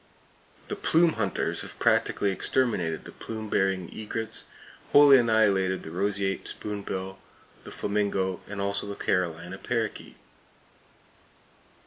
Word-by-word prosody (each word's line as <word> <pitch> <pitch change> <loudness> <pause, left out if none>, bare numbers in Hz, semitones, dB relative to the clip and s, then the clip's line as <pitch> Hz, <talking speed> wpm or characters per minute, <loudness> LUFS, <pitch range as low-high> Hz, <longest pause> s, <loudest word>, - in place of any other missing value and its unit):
The - - -3
"plume 165 0 +3
hunters" 100 -5 -1
have - - -9
practically 100 - +2
exterminated 95 -7 0
the - - -9
plume 110 -1 -7
bearing 95 -2 +1
egrets, 110 +1 -4 0.5
wholly 145 -2 +9
annihilated 100 -5 +2
the 80 - -8
roseate 95 +1 0
spoonbill, 95 -2 -5 0.5
the - - -9
flamingo, 100 -3 -1
and 105 -1 -6
also 100 0 -1
the 100 - -5
Carolina 90 0 -1
parrakeet. 115 -3 -3
100 Hz, 110 wpm, -27 LUFS, 95-110 Hz, 0.5 s, wholly